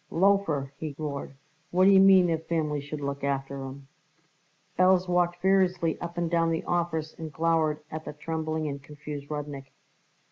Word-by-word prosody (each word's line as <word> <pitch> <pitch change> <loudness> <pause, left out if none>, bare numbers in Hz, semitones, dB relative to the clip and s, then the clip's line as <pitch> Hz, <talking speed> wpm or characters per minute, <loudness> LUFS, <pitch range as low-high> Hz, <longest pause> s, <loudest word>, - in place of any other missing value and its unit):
"Loafer!" 165 -7 +2
he 155 -3 -5
roared. 140 -3 -5 0.3
"What 185 +1 +3
d'ye 195 0 +7
mean, 190 -1 +7
their 165 -2 +1
families 155 -3 -2
should 145 0 -6
look 140 0 -4
after 135 -1 -1
'em?" 135 +1 -9 0.9
Belz 185 0 +4
walked 175 -1 +2
furiously 185 -2 +1
up 170 0 -6
and 170 -1 0
down 165 0 +2
the 165 0 -1
office 165 -3 -1
and 160 -1 -6
glowered 160 -1 +1
at 155 0 -6
the - - -6
trembling 160 0 -3
and 140 -1 -5
confused 145 0 -8
Rudnik. 145 -2 -6
160 Hz, 165 wpm, -27 LUFS, 145-175 Hz, 0.9 s, d'ye